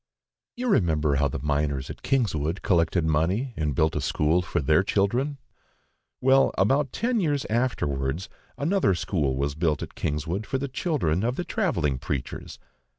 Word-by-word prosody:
You 250 +1 -3
remember 80 - +2
how 70 0 +2
the 65 - -4
miners 70 -2 -1
at - - -11
Kingswood 95 - 0
collected 85 -2 +2
money 90 - +1
and 75 -5 -1
built 80 +3 +2
a - - 0
school 80 +4 +2
for 85 - -2
their 75 +5 +3
children. 120 +9 0 0.8
Well, 135 +1 +4
about 135 +8 +2
ten 240 0 0
years 145 -7 0
afterwards, 80 - -1 0.3
another 160 - +2
school 75 -8 -1
was 70 +1 -1
built 80 -1 0
at - - -8
Kingswood 80 +8 -3
for 135 - -1
the 140 +1 -3
children 130 - 0
of 120 +2 0
the 175 - -3
travelling 85 - 0
preachers. 70 -1 -5
90 Hz, 155 wpm, -26 LUFS, -, 0.8 s, Well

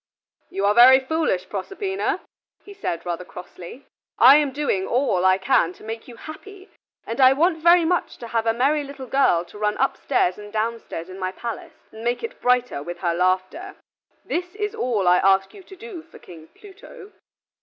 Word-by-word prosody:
"You 195 - -2
are 205 - +4
very 250 +3 +8
foolish, 270 - -1
Proserpina," 390 - -3 0.4
he 405 - -11
said, 175 - -4
rather 175 0 -4
crossly. 180 +7 -11 0.3
"I 265 +4 +8
am 295 -2 +1
doing 260 -9 -1
all 235 -8 +1
I 185 0 +5
can 180 -2 +1
to - - -18
make 225 +1 -7
you 245 - -11
happy, 380 - -12 0.3
and 230 +4 -3
I 260 0 +7
want 325 +4 +1
very 345 0 +5
much 355 +2 -1
to 235 - -9
have 230 0 -1
a - - +4
merry 285 +5 +1
little 280 -1 -9
girl 245 -10 +2
to 205 - -14
run 210 0 0
upstairs 255 -7 0
and 205 0 -11
downstairs 220 -6 -4
in 185 +1 -10
my 185 0 -2
palace 230 +3 -8
and 220 +1 -11
make 240 - -1
it 460 +2 -7
brighter 250 - +1
with 175 +4 -7
her 170 -2 0
laughter. 185 - -1 0.5
This 355 +2 -4
is 415 0 -3
all 220 -7 -1
I 180 0 +6
ask 195 0 +2
you 400 - -12
to 385 +1 -14
do 405 -4 -9
for 320 0 -17
King 160 -2 -14
Pluto." 400 - -15
245 Hz, 190 wpm, -22 LUFS, -, 0.5 s, very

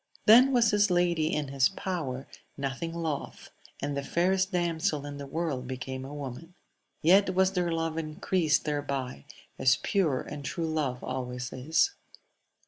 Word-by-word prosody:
Then 250 +5 +8
was 235 -4 +4
his 205 -1 +3
lady 175 -3 +2
in 150 -2 -1
his 135 -1 +3
power, 155 -9 -4 0.3
nothing 140 +4 -3
loth; 165 -4 -4 0.3
and 145 0 -2
the 140 - -1
fairest 190 +6 +1
damsel 165 -5 0
in 145 0 -6
the 140 -1 -7
world 140 -4 -3
became 130 +1 -5
a 135 - -8
woman. 145 +5 -7 0.5
Yet 185 +3 +5
was 190 0 +4
their 180 -2 0
love 165 0 -1
encreased 155 +1 0
thereby, 140 - -3 0.3
as 130 -1 +5
pure 165 -10 +1
and 145 -1 -7
true 165 +4 -3
love 135 -6 -1
alway 125 -1 -4 0.2
is. 155 - +1
155 Hz, 150 wpm, -29 LUFS, 135-180 Hz, 0.5 s, Then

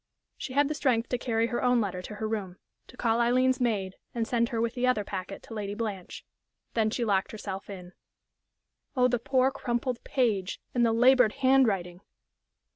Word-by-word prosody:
She 260 - -6
had 285 +1 +3
the 305 - -2
strength 250 -6 +1
to 250 - -1
carry 230 -2 0
her 240 0 -2
own 250 -1 +3
letter 190 -4 -2
to 210 +3 -8
her 215 +1 -3
room, 200 -5 -4 0.3
to 250 - -16
call 230 0 +1
Aileen's 255 +2 +2
maid 200 -6 -1 0.2
and 230 -1 -1
send 235 -1 +1
her 230 - -2
with 230 0 0
the 250 0 0
other 250 -5 +2
packet 195 0 -6
to - - -10
Lady 205 -2 -4
Blanche. 205 -5 -5 0.5
Then 220 -2 +2
she 235 +2 -1
locked 195 -2 +1
herself 195 -3 -6
in.... 180 -2 -9 1.0
Oh, 250 0 +5
the 245 -1 0
poor, 260 +2 +2
crumpled 245 -2 -2
page, 210 -8 0
and 245 - +2
the 230 - +4
labored 245 -1 +5
hand 270 -1 +4
writing! 180 -3 -2
230 Hz, 195 wpm, -28 LUFS, 205-250 Hz, 1.0 s, Oh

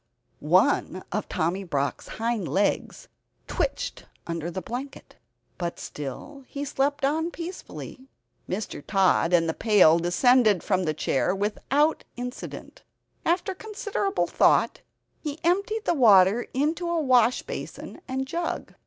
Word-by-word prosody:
One 185 +3 +2
of 210 +2 -3
Tommy 175 +5 -1
Brock's 145 -6 -2
hind 225 -5 -1
legs 200 +1 -1 0.4
twitched - - -3 0.2
under 170 0 -3
the 190 - -4
blanket, 250 +9 -7 0.4
but 175 -1 -3
still 150 - -7
he 285 0 -5
slept 285 0 0
on 320 +4 0
peacefully. 335 -6 -8 0.4
Mr. 185 -6 -4
Tod 190 -3 +2
and 170 -2 +4
the 160 - 0
pail 185 -7 +5
descended 210 +3 +4
from 185 -3 +1
the 155 -1 -1
chair 155 +5 0
without 275 +10 +1
accident. 245 +1 -7 0.5
After 355 +3 +1
considerable 410 0 -2
thought, - - +3 0.4
he 295 -1 -5
emptied 400 +6 +1
the - - +2
water 215 - +5
into 315 +6 -1
a 340 -1 +1
wash 255 -4 +3
basin - - -7
and 265 0 -2
jug. 335 +5 -4
240 Hz, 125 wpm, -26 LUFS, 185-300 Hz, 0.5 s, pail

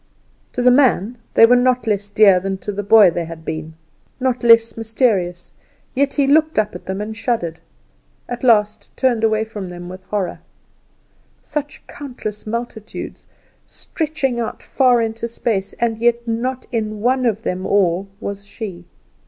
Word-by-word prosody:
To 245 - -1
the 250 - +6
man 245 -4 +3 0.2
they 230 - +9
were 245 +2 +5
not 250 -1 +2
less 205 -2 0
dear 200 -3 +5
than 195 +1 -3
to 205 - -1
the 205 0 -3
boy 205 -2 +6
they 170 0 -3
had 165 -1 -10
been 160 0 -5 0.4
not 255 -2 -1
less 230 -1 +5
mysterious; 215 -6 0 0.4
yet 275 +1 +1
he 280 - +3
looked 310 +3 +3
up 215 -1 +1
at 180 - -10
them 190 +2 -3
and 215 +1 -5
shuddered; 220 -9 -2 0.7
at 245 +1 -6
last 215 -3 +2
turned 245 -4 +1
away 220 -1 +2
from 210 -4 -7
them 175 0 -8
with 185 +1 -10
horror. 195 -1 -3 1.0
Such 295 -1 -5
countless 220 -7 -7
multitudes 225 -1 -6 0.4
stretching 300 -6 -3
out 230 - -4
far 250 -3 +3
into 225 +1 -3
space, 220 -4 -2
and 230 -2 -1
yet 235 0 +1
not 250 +3 -2
in 215 -3 -3
one 255 +2 +2
of 225 -1 -1
them 185 -3 -3
all 190 -1 +2
was 200 -2 -5
she! 190 -5 -7
225 Hz, 160 wpm, -19 LUFS, 195-245 Hz, 1.0 s, they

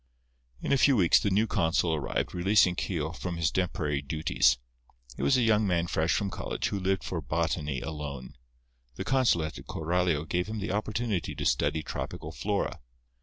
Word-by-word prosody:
In - - -1
a 140 - +3
few 140 0 +5
weeks 90 -7 +5
the 100 - 0
new 100 +3 +3
consul 85 -5 +1
arrived, 75 -3 -2
releasing 90 0 +4
Keogh 80 -3 -2
from 85 0 -5
his 80 -1 +1
temporary 75 -6 -1
duties. 70 -4 +2 0.6
He - - -6
was 135 - +4
a 125 - +2
young 110 -2 +3
man 85 -2 +1
fresh 80 -1 0
from 100 -2 -1
college, - - -3
who 100 - -2
lived 95 0 0
for 85 -3 -3
botany 75 -1 -1
alone. 70 -5 -6 0.6
The - - -4
consulate 85 -12 +1
at - - -13
Coralio 85 -1 0
gave 90 +2 -1
him 110 +1 -4
the 100 -1 -3
opportunity 110 -2 -2
to - - -4
study 80 - +1
tropical - - -5
flora. 100 -1 -2
90 Hz, 175 wpm, -29 LUFS, 80-100 Hz, 0.6 s, few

